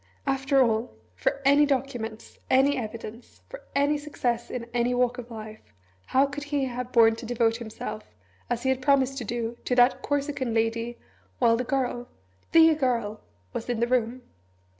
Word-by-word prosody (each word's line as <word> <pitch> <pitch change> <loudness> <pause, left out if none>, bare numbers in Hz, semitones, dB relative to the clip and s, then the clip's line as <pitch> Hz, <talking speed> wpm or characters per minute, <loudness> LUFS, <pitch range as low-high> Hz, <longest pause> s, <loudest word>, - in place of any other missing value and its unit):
After 270 0 +3
all 220 - -1 0.2
for 95 - -1
any 285 +2 +6
documents, 245 -5 -3
any 270 +2 +4
evidence, 230 -1 -7
for - - -9
any 285 +1 +2
success 245 -5 -2
in 245 -2 -4
any 245 +1 +1
walk 250 0 +1
of 240 0 -8
life, 220 -1 -9 0.5
how 265 +2 +4
could 285 +1 -6
he 290 -2 0
have 250 0 -5
borne 225 -2 +5
to 230 - -8
devote 230 -1 +1
himself, 220 -2 -7 0.4
as 240 0 -2
he 265 - +1
had 265 0 +1
promised 270 -1 +2
to - - -4
do, 235 +1 -3
to 250 - 0
that 245 +1 +4
Corsican 280 -4 -2
lady, 230 +1 -1 0.4
while 230 - +4
the 245 - -1
Girl, 245 -2 -2 0.4
the 325 -1 +7
Girl, 235 -7 -1 0.3
was 230 - -5
in 240 -2 -1
the 235 - +3
room? 245 0 0
245 Hz, 170 wpm, -26 LUFS, 230-270 Hz, 0.5 s, the